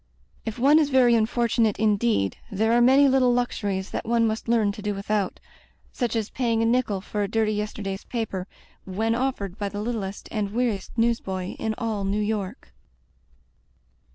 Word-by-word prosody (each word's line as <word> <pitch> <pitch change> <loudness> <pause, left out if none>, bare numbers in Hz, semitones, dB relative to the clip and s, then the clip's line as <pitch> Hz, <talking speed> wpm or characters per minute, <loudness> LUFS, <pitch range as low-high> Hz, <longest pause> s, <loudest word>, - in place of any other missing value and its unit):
If 220 - -3
one 280 +5 +5
is 300 -2 +2
very 255 -3 +5
unfortunate 230 -1 +2
indeed, 215 - +1
there 220 +3 +1
are 240 - +4
many 265 +3 +6
little 260 -2 +4
luxuries 200 -6 -2
that - - -3
one 230 0 +2
must 220 +1 -2
learn 225 -3 +3
to 205 - -9
do 205 0 -2
widiout 200 -1 -1 0.3
— - - -35
such 240 -2 0
as 220 -2 -2
paying 230 -3 0
a - - +2
nickel 230 -5 +1
for 210 +1 -4
a 200 - 0
dirty 220 +1 +1
yesterday's 205 -2 -4
paper, 210 -6 -4 0.4
when 220 +4 -1
offered 230 -6 -2
by 205 -1 -1
the 205 - -5
littlest 210 -3 -4
and 210 -2 -2
weariest 235 -4 -2
newsboy 195 -6 0
in 220 -1 -1
all 220 -3 -2
New 195 +1 0
York. 210 -3 -3
220 Hz, 175 wpm, -25 LUFS, 200-235 Hz, 0.4 s, many